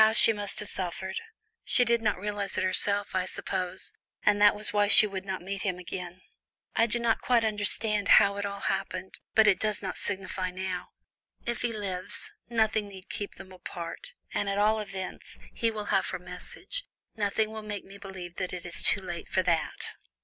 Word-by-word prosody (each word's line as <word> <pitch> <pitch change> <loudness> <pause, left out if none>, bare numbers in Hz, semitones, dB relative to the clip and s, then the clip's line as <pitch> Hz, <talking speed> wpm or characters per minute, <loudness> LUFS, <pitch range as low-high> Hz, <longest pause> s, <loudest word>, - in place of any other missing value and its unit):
How 220 0 +4
she 225 - +7
must 205 -1 -2
have - - -4
suffered! 190 - -3 0.4
She 245 - +4
did 235 0 +2
not 210 -2 +1
realize 205 +1 -3
it - - +1
herself, 200 +2 +1
I 185 -1 0
suppose, 185 -1 -2 0.3
and 205 0 +3
that 205 0 +7
was 210 0 +2
why 205 0 +3
she 215 - +12
would 195 -2 -5
not 190 -2 -4
meet 195 +1 -4
him 185 -3 -1
again. 180 0 -7 0.5
I 230 - +4
do 240 - +1
not 235 -1 +1
quite 240 -2 +3
understand 210 0 +1
how 200 0 +4
it 205 - -2
all 200 0 -4
happened, 190 0 -3 0.2
but 220 - +6
it 210 -3 +4
does 215 -1 -1
not - - -3
signify 190 -2 -3
now. 185 0 -4 0.6
If 240 0 -2
he 240 - 0
lives, 195 -4 -2 0.2
nothing 220 -2 +1
need 190 -2 -12
keep 205 - -5
them 190 -1 -12
apart, 175 -2 -8 0.2
and 205 - -1
at 195 - -1
all 215 +2 +3
events, 195 -3 -6 0.2
he 230 - 0
will 210 -2 -4
have - - +2
her - - -3
message. - - -7 0.3
Nothing 215 +1 0
will 220 0 -6
make 210 -1 -5
me 200 +1 -12
believe 185 -3 -9
that 185 -1 -3
it 180 -1 -6
is 170 - +2
too 205 - +3
late 175 -2 -6
for 185 - +1
that." 170 -2 -1
200 Hz, 200 wpm, -28 LUFS, 185-215 Hz, 0.6 s, she